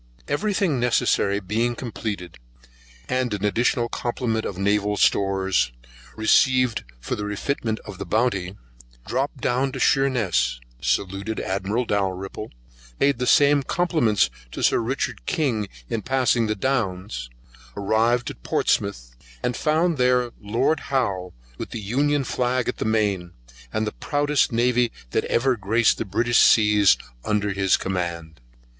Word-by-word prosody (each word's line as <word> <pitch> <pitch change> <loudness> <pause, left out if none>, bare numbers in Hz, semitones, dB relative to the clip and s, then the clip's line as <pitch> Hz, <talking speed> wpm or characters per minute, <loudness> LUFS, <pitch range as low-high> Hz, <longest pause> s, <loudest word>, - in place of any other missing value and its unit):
Every 205 +9 0
thing 165 -11 +1
necessary 105 -4 +2
being 110 +5 -1
completed, 105 - -6 0.7
and 125 -4 0
an 105 0 -3
additional 120 +3 +1
complement 120 -2 -2
of 95 - -4
naval 105 +1 +1
stores, 95 -8 +2 0.4
received 125 +2 +3 0.2
for - - -4
the - - -6
refitment 110 +2 -2
of 95 - -10
the - - -4
Bounty; 100 -5 0 0.5
dropped 135 +3 -2
down 130 +3 +1
to - - -5
Sheerness, 115 - +2 0.2
saluted 100 +6 -1
Admiral 100 +6 -1
Dalrymple, 95 0 -2 0.5
payed 140 -3 +2
the 125 - -1
same 145 +1 +5
compliments 135 - +1 0.2
to - - -5
Sir - - +4
Richard 130 +4 -3
King, 130 - 0 0.2
in 110 - -2
passing 125 -3 +1
the 105 - 0
Downs, 95 - -2 0.5
arrived 110 +4 +1
at - - -14
Portsmouth, - - -1 0.3
and 125 - 0
found 160 0 +1
there 125 -1 +2
Lord 120 +9 +1
Howe 100 -10 -1 0.3
with - - -5
the 115 - -5
Union 140 +7 +1
Flag 125 -1 -1
at - - -2
the - - -3
main, 100 -6 0 0.4
and 110 - -1
the 105 - -2
proudest 145 -1 0
navy 120 +1 +2 0.2
that - - 0
ever 130 +1 +2
graced 110 +2 +2
the - - -2
British 115 +5 +2
seas 105 -2 +5 0.3
under 105 -1 0
his 95 -1 +2
command. 85 -5 -4
110 Hz, 140 wpm, -23 LUFS, 100-125 Hz, 0.7 s, same